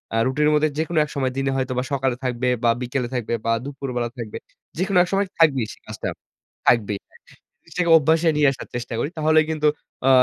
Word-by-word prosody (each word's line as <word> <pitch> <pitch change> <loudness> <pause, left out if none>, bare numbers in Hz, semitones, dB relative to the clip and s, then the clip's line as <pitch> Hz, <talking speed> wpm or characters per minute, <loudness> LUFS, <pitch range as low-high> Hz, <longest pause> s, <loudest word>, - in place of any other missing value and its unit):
আ - - +2
রুটিনের 150 +3 +2
মধ্যে 155 +1 +3
যেকোন 160 +2 -2
এক 150 - -6
সময় 130 -2 0
দিনে 135 0 0
হয়তোবা 130 -1 -1
সকালে 130 -2 +1
থাকবে 125 0 -1 0.2
বা, 120 - +4
বিকেলে 125 0 -2
থাকবে 120 -1 -2
বা, 115 - +2
দুপুরবেলা 130 -4 -3
থাকবে। 115 -3 -6 0.4
যেকোনো 190 +2 +1
এক - - -4
সময় 200 +1 +2
থাকবেই 135 -8 +4
সে - - -16
কাজটা 110 0 -5 0.6
থাকবেই, 105 -4 +3
হ্যাঁ। - - -22 0.5
সেটাকে 175 -2 +1
অভ্যাসে 160 +2 +3
নিয়ে 150 - +5
আসার 135 - -8
চেষ্টা 120 0 -4
করি। 145 - -1
তাহলে 155 0 +4
কিন্তু 155 -1 +1 0.4
আ - - +6
135 Hz, 195 wpm, -22 LUFS, 125-155 Hz, 0.6 s, আ